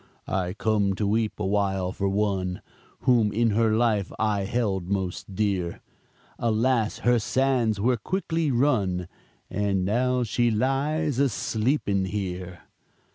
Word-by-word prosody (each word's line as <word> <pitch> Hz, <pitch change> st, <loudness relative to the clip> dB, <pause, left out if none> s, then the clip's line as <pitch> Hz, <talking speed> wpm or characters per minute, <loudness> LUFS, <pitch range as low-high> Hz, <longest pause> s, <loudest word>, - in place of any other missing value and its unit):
"I 90 Hz, -1 st, -1 dB
come 105 Hz, -3 st, +1 dB
to 105 Hz, -, -1 dB
weep 110 Hz, +1 st, 0 dB
a 105 Hz, -, -1 dB
while 95 Hz, -2 st, 0 dB
for 100 Hz, +1 st, -1 dB
one 95 Hz, -2 st, -1 dB, 0.4 s
Whom 115 Hz, -5 st, +3 dB
in 115 Hz, +1 st, +2 dB
her 110 Hz, +1 st, +2 dB
life 110 Hz, -5 st, +1 dB
I 105 Hz, -3 st, 0 dB
held 95 Hz, -5 st, -1 dB
most 95 Hz, 0 st, -3 dB
dear, 95 Hz, -5 st, -1 dB, 0.6 s
Alas, 115 Hz, 0 st, +1 dB
her 120 Hz, -1 st, +4 dB
sands 125 Hz, -3 st, +1 dB
were 120 Hz, +4 st, +2 dB
quickly 165 Hz, -, -1 dB
run, 110 Hz, -9 st, +1 dB, 0.4 s
And 100 Hz, -2 st, 0 dB
now 125 Hz, +4 st, +1 dB
she 120 Hz, +1 st, +1 dB
lies 135 Hz, +5 st, 0 dB
a 140 Hz, -1 st, +4 dB
sleeping 110 Hz, -3 st, 0 dB
here." 90 Hz, -3 st, -4 dB
105 Hz, 130 wpm, -26 LUFS, 95-120 Hz, 0.6 s, her